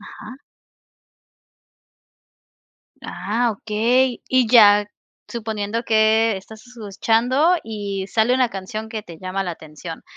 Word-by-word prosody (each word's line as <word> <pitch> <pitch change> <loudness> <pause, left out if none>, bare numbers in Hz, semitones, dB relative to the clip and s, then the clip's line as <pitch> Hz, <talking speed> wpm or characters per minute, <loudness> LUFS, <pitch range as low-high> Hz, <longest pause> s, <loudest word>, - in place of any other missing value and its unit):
Ajá. 255 - -11 2.7
Ah, 225 +6 -2
okey. 235 +5 0
Y 255 -2 +3
ya, 210 -3 +6 0.4
suponiendo 220 -1 -4
que 220 -1 +3
estás 220 +4 -12
escuchando 245 - +1
y 200 -3 -5
sale 225 +4 +1
una 255 -2 +2
canción 215 +3 -6
que 220 -2 -6
te 170 -5 -12
llama 185 +1 -3
la 180 - -4
atención. 160 +1 -10
220 Hz, 105 wpm, -21 LUFS, 200-235 Hz, 2.7 s, ya